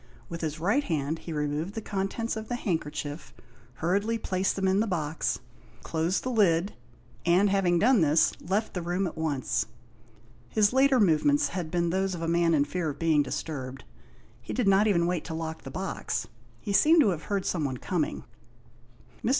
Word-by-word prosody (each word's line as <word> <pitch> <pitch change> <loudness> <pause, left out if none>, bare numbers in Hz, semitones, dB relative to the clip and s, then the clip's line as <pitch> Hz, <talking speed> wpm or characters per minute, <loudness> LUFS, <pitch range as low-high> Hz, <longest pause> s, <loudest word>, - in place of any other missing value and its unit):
With 170 0 -6
his 155 -1 -3
right 205 - +2
hand 160 - -2
he 170 - -8
removed 150 +5 -2
the - - -2
contents 210 +3 -3
of 220 0 -6
the 245 - -2
handkerchief, 155 -7 -4 0.4
hurriedly 200 - 0
placed 190 -3 -1
them 190 -1 0
in 190 +1 +3
the 225 - +1
box, 160 -5 -1 0.4
closed 165 +3 -1
the 255 - -2
lid, 195 -5 +2 0.5
and 185 +4 +4
having 185 -3 +2
done 235 +3 +4
this, 155 +1 +4
left 200 +5 -1
the 180 - -3
room 175 +3 -1
at 175 - -4
once. 140 - -1 0.8
His 210 - +3
later 265 0 +4
movements 225 - +3
had 175 -4 -4
been 170 0 0
those 190 0 0
of 165 - -5
a - - -1
man 170 0 +3
in 145 -1 +3
fear 165 +2 -2
of 145 - -6
being 160 -1 +3
disturbed. 135 -3 -5 0.6
He - - -6
did 245 -5 0
not 195 +2 +5
even 170 -5 +3
wait 175 -2 -1
to 160 - -5
lock 160 0 -5
the - - -8
box. 185 -10 -3 0.3
He 200 - -4
seemed 315 +9 +6
to 230 - +4
have 165 -4 -3
heard 200 -2 -1
someone 145 -7 -1
coming. - - -2 1.0
Mr. - - +1
175 Hz, 185 wpm, -28 LUFS, 160-200 Hz, 1.0 s, seemed